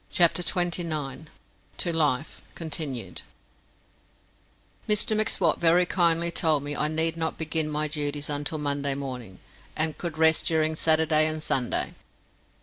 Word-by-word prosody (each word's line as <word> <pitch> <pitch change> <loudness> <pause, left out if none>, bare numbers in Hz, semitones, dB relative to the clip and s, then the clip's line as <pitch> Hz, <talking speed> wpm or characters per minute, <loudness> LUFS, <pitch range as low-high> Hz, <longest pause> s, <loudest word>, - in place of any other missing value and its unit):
CHAPTER 175 0 +3
TWENTY 175 0 0
NINE 150 -2 -5 0.5
To 170 - -1
Life 150 -3 0
continued 140 - -4 1.7
Mr 210 +1 +2
M'Swat 200 -6 +1
very 170 +2 +4
kindly 170 -1 +2
told 155 -4 +1
me 145 0 -4
I 150 - +1
need 160 +1 +1
not 160 -1 -2
begin 160 -1 0
my 150 0 -1
duties 145 -1 -3
until 145 +2 -2
Monday 140 -1 -1
morning, 125 -8 -7 0.4
and 155 0 0
could 170 -3 -5
rest 160 0 +4
during 160 -1 +1
Saturday 155 -1 +3
and 155 0 -3
Sunday. 125 -3 -1
155 Hz, 135 wpm, -26 LUFS, 145-165 Hz, 1.7 s, very